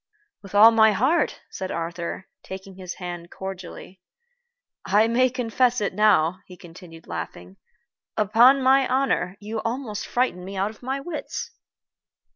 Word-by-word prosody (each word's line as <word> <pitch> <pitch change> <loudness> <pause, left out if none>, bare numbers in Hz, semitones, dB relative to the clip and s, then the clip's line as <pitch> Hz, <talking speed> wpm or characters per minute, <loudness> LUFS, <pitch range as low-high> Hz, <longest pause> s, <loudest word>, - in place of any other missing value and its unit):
"With 200 0 -10
all 220 +3 +9
my 220 -1 +5
heart," 270 - +1
said 190 -1 -5
Arthur, 170 +2 -4 0.2
taking 190 0 -9
his 185 -1 -8
hand 175 -2 -7
cordially. 190 -1 -9 0.8
"I 205 +3 +3
may 255 +3 +3
confess 245 0 +1
it 205 -3 -2
now," 185 -4 +3
he 180 - -13
continued, 170 -1 -13
laughing, 90 +3 -7 0.6
"upon 240 +6 +5
my 265 +1 +4
honor, 255 -8 0
you 215 +2 -5
almost 230 -3 -4
frightened 245 -8 -1
me 195 +1 -7
out 195 +3 0
of 220 - -19
my 265 +2 -3
wits." 315 +9 -6
205 Hz, 140 wpm, -24 LUFS, 180-245 Hz, 0.8 s, all